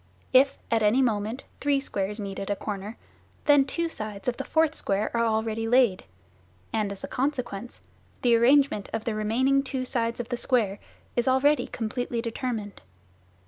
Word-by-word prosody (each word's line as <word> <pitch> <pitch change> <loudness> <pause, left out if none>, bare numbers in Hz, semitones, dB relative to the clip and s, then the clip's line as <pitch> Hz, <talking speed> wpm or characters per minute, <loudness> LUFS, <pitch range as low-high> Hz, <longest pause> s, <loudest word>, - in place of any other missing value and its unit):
If 270 +2 +5
at 225 -1 +3
any 215 +4 +4
moment 220 +2 -1 0.2
three 285 -1 +2
squares 210 -5 -3
meet 195 -2 -5
at 195 - -5
a 205 - +1
corner, 205 +2 -5 0.5
then 290 -2 +6
two 335 +4 -1
sides 215 -9 -7
of 245 -1 0
the - - -3
fourth 320 -1 +2
square 205 -4 -1
are 230 0 +2
already 220 0 -1
laid, 235 -5 +3 0.7
and, 215 -3 0
as 200 - -6
a - - -3
consequence, 245 -5 -3 0.4
the 240 -2 +5
arrangement 260 -2 +4
of 225 -1 -2
the 230 - -1
remaining 245 +6 +2
two 265 -1 -3
sides 230 -2 -1
of 240 0 -4
the 245 - -2
square 225 -6 +1 0.4
is 240 0 +1
already 275 +3 +3
completely 235 +1 -3
determined. 230 -3 -4
235 Hz, 170 wpm, -26 LUFS, 215-260 Hz, 0.7 s, then